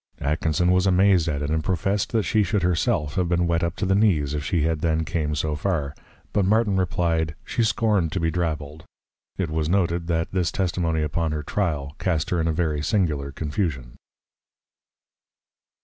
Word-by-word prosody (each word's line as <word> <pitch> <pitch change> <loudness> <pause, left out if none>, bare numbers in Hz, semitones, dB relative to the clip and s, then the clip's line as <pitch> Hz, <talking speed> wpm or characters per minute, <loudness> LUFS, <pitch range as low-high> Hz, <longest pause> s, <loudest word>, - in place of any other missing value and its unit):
Atkinson 80 +4 +1
was 90 +1 +3
amazed 95 -2 +4
at 75 -2 -1
it; 75 - -2
and 80 0 0
professed, 95 +3 0
that 110 -2 +1
she 110 0 +2
should 105 -2 0
her 90 +1 +3
self 75 -3 0
have 90 +1 0
been 85 0 +2
wet 85 0 +1
up 85 +1 -1
to 95 - -2
the 95 - +2
knees, 90 -9 +2
if 75 -1 -2
she 80 +1 0
had 80 0 0
then 80 -1 +1
came 75 0 -1
so 75 +1 -1
far; 75 -4 -1 0.4
but 100 - +2
Martin 105 +1 +2
reply'd, 85 -4 0
She - - -1
scorn'd 105 -6 +1
to 95 - -1
be 80 -1 0
Drabbled! 80 -2 -3 0.5
It 90 -5 -2
was 80 -1 -1
noted, 85 -3 +1
that 80 -1 -1
this 90 -3 0
Testimony 85 -4 0
upon 80 +1 -1
her 75 -1 -3
Trial, 75 -6 -2
cast 85 -3 -1
her 90 -2 +1
in 80 - 0
a - - +2
very 80 -2 -1
singular 75 -6 0
Confusion. 75 -4 -3
85 Hz, 190 wpm, -24 LUFS, 75-95 Hz, 0.5 s, amazed